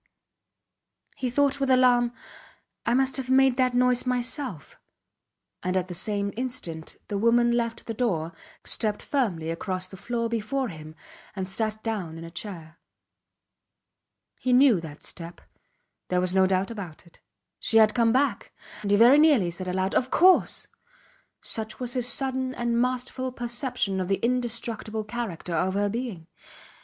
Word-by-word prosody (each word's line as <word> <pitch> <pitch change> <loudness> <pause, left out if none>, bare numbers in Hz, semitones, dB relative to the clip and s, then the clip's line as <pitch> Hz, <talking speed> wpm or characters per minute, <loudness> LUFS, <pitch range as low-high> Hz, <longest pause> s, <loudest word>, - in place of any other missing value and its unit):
He 255 - -2
thought 280 +2 +2
with 275 -1 0
alarm: 250 -2 +4 0.8
I 235 - +3
must 265 +1 +2
have 260 -1 -4
made 265 -1 +5
that 255 -1 +2
noise 250 0 +3
myself; 250 - -3 0.8
and 185 +1 0
at 185 0 -2
the - - -4
same 200 +2 -1
instant 195 -10 -5
the 200 - -2
woman 235 +2 +4
left 230 -1 -1
the 225 - -4
door, 175 -9 -1 0.3
stepped 210 -2 -1
firmly 180 - -1
across 185 +2 -3
the 190 - -11
floor 230 +4 -2
before 235 +3 -2
him, 155 -2 -10 0.4
and 190 -2 -3
sat 215 +2 -2
down 195 -8 -3
in 165 - -8
a 165 - -9
chair. 165 -3 -8 1.6
He 255 - +1
knew 250 -8 +6
that 155 -2 -10
step. 170 0 -8 0.7
There 180 - +1
was 180 0 +1
no 190 0 +4
doubt 190 +2 0
about 190 -7 -8
it. 170 - -21 0.4
She 225 - +2
had 215 -1 +6
come 230 -1 +3
back! 260 -3 0 0.3
And 205 - -3
he 205 - +4
very 245 +6 +7
nearly 280 - +4
said 185 +2 -6
aloud 185 +1 -1
Of 255 - +1
course! 365 +6 +4 0.8
such 220 -1 -5
was 250 -1 -3
his 250 -2 0
sudden 260 +1 -1
and 235 0 0
masterful 255 +1 -2
perception 240 -4 -2
of 185 - -3
the 195 0 +1
indestructible 235 -3 -2
character 210 -6 -5
of 185 +3 0
her 205 0 +1
being. 220 -7 -4
225 Hz, 155 wpm, -26 LUFS, 185-250 Hz, 1.6 s, very